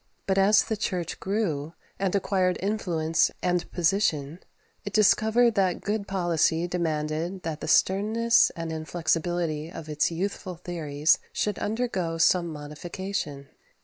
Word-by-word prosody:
But 195 Hz, 0 st, +1 dB
as 200 Hz, +2 st, +5 dB
the 220 Hz, -, -2 dB
Church 180 Hz, -5 st, -3 dB
grew, 170 Hz, -7 st, -2 dB, 0.3 s
and 195 Hz, 0 st, 0 dB
acquired 185 Hz, -2 st, +1 dB
influence 175 Hz, -6 st, +1 dB
and 180 Hz, -1 st, 0 dB
position, 165 Hz, -4 st, 0 dB, 0.4 s
it 205 Hz, -, -6 dB
discovered 220 Hz, +3 st, +4 dB
that 190 Hz, -4 st, +1 dB
good 205 Hz, 0 st, -2 dB
policy 175 Hz, -3 st, +1 dB
demanded 165 Hz, +1 st, -2 dB
that 160 Hz, -2 st, -4 dB
the -, -, -4 dB
sternness 220 Hz, +5 st, +3 dB
and 165 Hz, -1 st, -4 dB
inflexibility 165 Hz, 0 st, -1 dB
of 160 Hz, -, -8 dB
its 150 Hz, -1 st, +1 dB
youthful 185 Hz, +1 st, -4 dB
theories 160 Hz, -4 st, 0 dB
should 210 Hz, -3 st, -1 dB
undergo 205 Hz, -7 st, -2 dB
some 170 Hz, +2 st, +3 dB
modification. 150 Hz, -1 st, -5 dB
175 Hz, 125 wpm, -26 LUFS, 160-200 Hz, 0.4 s, as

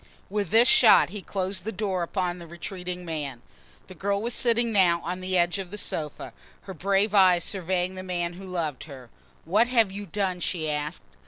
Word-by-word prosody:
With 205 Hz, -3 st, -2 dB
this 230 Hz, +3 st, +6 dB
shot 230 Hz, -, +7 dB
he 205 Hz, +2 st, -7 dB
closed 190 Hz, -1 st, -3 dB
the 220 Hz, -, -4 dB
door 190 Hz, -2 st, -2 dB
upon 180 Hz, 0 st, -2 dB
the 170 Hz, -, -10 dB
retreating 180 Hz, +1 st, -7 dB
man. 145 Hz, -7 st, -5 dB, 0.4 s
The 185 Hz, -, -12 dB
girl 200 Hz, +2 st, -1 dB
was 235 Hz, +3 st, -3 dB
sitting 235 Hz, -1 st, +2 dB
now 180 Hz, -5 st, +4 dB
on 180 Hz, +2 st, -4 dB
the 185 Hz, 0 st, 0 dB
edge 175 Hz, +2 st, +1 dB
of 190 Hz, -2 st, -6 dB
the 210 Hz, -, -7 dB
sofa, 155 Hz, -6 st, -4 dB, 0.3 s
her 190 Hz, -, -9 dB
brave 195 Hz, +4 st, +1 dB
eyes 185 Hz, -4 st, +5 dB
surveying 185 Hz, -1 st, -2 dB
the 185 Hz, -, -7 dB
man 175 Hz, -2 st, -3 dB
who 190 Hz, +2 st, -10 dB
loved 165 Hz, -7 st, -3 dB
her. 130 Hz, -6 st, -12 dB, 0.3 s
"What 210 Hz, +8 st, +3 dB
have 230 Hz, -5 st, +2 dB
you 200 Hz, +1 st, -7 dB
done?" 190 Hz, -3 st, -2 dB
she 160 Hz, -3 st, -2 dB
asked. 150 Hz, +2 st, -4 dB
185 Hz, 195 wpm, -26 LUFS, 175-200 Hz, 0.4 s, shot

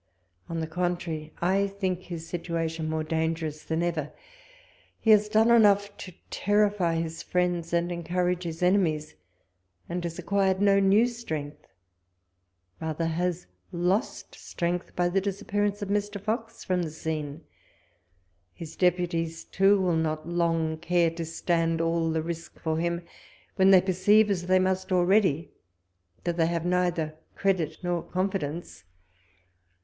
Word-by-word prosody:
On 165 Hz, -1 st, -2 dB
the -, -, -1 dB
contrary, 170 Hz, -2 st, -3 dB
I 195 Hz, +3 st, +2 dB
think 190 Hz, -2 st, -2 dB
his 170 Hz, -3 st, -8 dB
situation 165 Hz, -2 st, -3 dB
more 160 Hz, 0 st, -1 dB
dangerous 160 Hz, -1 st, -2 dB
than 160 Hz, +1 st, -1 dB
ever: 160 Hz, -4 st, -2 dB, 0.9 s
he 225 Hz, -, +3 dB
has 210 Hz, 0 st, +5 dB
done 220 Hz, +2 st, +4 dB
enough 205 Hz, -3 st, +4 dB
to 185 Hz, -, -9 dB, 0.2 s
terrify 205 Hz, -4 st, +2 dB
his 165 Hz, 0 st, -3 dB
friends, 175 Hz, -2 st, -1 dB
and 170 Hz, +1 st, +1 dB
encoux 175 Hz, +1 st, 0 dB
age 180 Hz, 0 st, -3 dB
his 165 Hz, +1 st, -4 dB
enemies, 170 Hz, -5 st, +2 dB, 0.7 s
and 175 Hz, +1 st, -3 dB
has 170 Hz, -1 st, -4 dB
acquired 190 Hz, +1 st, +1 dB
no 200 Hz, 0 st, +4 dB
new 200 Hz, +4 st, +5 dB
strength; 155 Hz, -12 st, -5 dB, 1.1 s
rather 160 Hz, +1 st, -2 dB
has 175 Hz, +2 st, -1 dB, 0.3 s
lost 185 Hz, +6 st, -1 dB
strength, 175 Hz, 0 st, -3 dB
by 175 Hz, 0 st, +2 dB
the 190 Hz, +2 st, +1 dB
disappearance 205 Hz, +1 st, -1 dB
of 200 Hz, -, -5 dB
Mr. 205 Hz, 0 st, -1 dB
Fox 225 Hz, +2 st, -4 dB
from 185 Hz, -1 st, 0 dB
the 165 Hz, -, -2 dB
scene. 155 Hz, -1 st, -5 dB, 1.1 s
His 160 Hz, -1 st, -9 dB
deputies, 170 Hz, -2 st, 0 dB
too, 195 Hz, +1 st, +3 dB
will 180 Hz, -3 st, +1 dB
not 155 Hz, -1 st, -1 dB
long 165 Hz, -2 st, 0 dB
care 175 Hz, -1 st, +2 dB
to 165 Hz, 0 st, -5 dB
stand 165 Hz, 0 st, 0 dB
all 165 Hz, 0 st, +1 dB
the 160 Hz, -1 st, 0 dB
risk 165 Hz, 0 st, -6 dB
for 160 Hz, 0 st, -1 dB
him, 170 Hz, +1 st, -1 dB, 0.5 s
when 190 Hz, 0 st, +5 dB
they 190 Hz, -2 st, +8 dB
perceive, 205 Hz, +3 st, +4 dB
as 175 Hz, -2 st, -2 dB
they 185 Hz, 0 st, +5 dB
must 185 Hz, 0 st, 0 dB
already, 180 Hz, -4 st, +3 dB, 0.7 s
that 175 Hz, -1 st, -2 dB
they 165 Hz, -1 st, +3 dB
have 170 Hz, 0 st, -2 dB
neither 175 Hz, -3 st, 0 dB, 0.2 s
credit 175 Hz, -6 st, 0 dB
nor 175 Hz, -1 st, 0 dB
confidence. 180 Hz, -, -3 dB
175 Hz, 145 wpm, -27 LUFS, 165-190 Hz, 1.1 s, they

